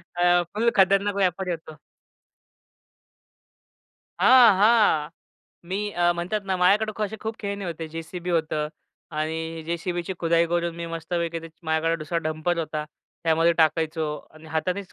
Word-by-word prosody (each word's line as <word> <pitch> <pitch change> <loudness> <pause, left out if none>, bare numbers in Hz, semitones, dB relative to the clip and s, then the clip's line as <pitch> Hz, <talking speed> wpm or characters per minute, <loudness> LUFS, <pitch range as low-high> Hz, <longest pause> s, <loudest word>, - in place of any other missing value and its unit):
अ, 175 0 +4
फुल 230 +3 +2
खतरनाक 195 +1 +3
व्यापारी 185 -1 0
होतो. 160 -2 -7 2.5
हां, 250 -5 +8
हां. 210 -9 +4 0.6
मी 190 - -1
अ, 175 -1 +2
म्हणतात 175 +5 -2
ना, 190 -1 0
माझ्याकडे 205 +4 +3
क 215 - -6
असे 210 +1 -2
खूप 220 0 -4
खेळणी 200 -2 -4
होते, 165 -1 -5
जेसीबी 165 +3 -6
होतं 155 -2 0 0.5
आणि 160 +1 -3
जेसीबीची 175 +2 -3
खुदाई 170 0 +3
करून 170 0 -1
मी 170 0 -5
मस्तपैकी 165 0 -3
त्याची 165 0 -13
माझ्याकडे 160 +1 +1
दुसरा 170 +3 -2
डंपर 155 +2 -1
होता. 155 -1 -3 0.4
त्यामध्ये 165 +1 +3
टाकायचो 160 0 +2 0.3
आणि 155 0 -15
हातानेच 180 +5 -2
170 Hz, 135 wpm, -25 LUFS, 160-190 Hz, 2.5 s, हां